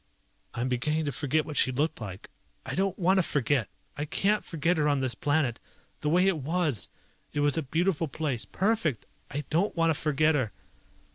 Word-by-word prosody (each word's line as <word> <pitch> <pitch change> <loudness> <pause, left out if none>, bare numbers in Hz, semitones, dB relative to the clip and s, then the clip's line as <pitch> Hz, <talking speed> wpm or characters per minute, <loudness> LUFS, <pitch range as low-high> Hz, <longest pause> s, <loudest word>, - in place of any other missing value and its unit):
"I'm 120 +2 -1
beginning 150 +5 0
to 145 - -1
forget 145 +3 0
what 150 - -6
she 130 - +6
looked 145 +1 -1
like. 100 -2 -8 0.3
I - - -4
don't 195 0 0
want 190 +1 +3
to - - +6
forget! 140 - 0 0.3
I 145 - -3
can't 200 +7 +1
forget 165 +2 0
her 150 -1 +2
on 145 -1 +2
this 130 -2 0
planet. 140 -1 0 0.4
The 150 - -1
way 180 +4 +4
it 190 -5 +2
was! 150 - -1 0.4
It 145 - 0
was 145 -1 +3
a 165 - +1
beautiful 165 +3 0
place, 140 -6 -2
perfect! 190 - 0 0.2
I 145 +2 -3
don't 175 +7 +1
want 165 -1 +3
to 155 - -3
forget 155 +1 +3
her!" 130 -8 0
150 Hz, 195 wpm, -28 LUFS, 135-170 Hz, 0.4 s, she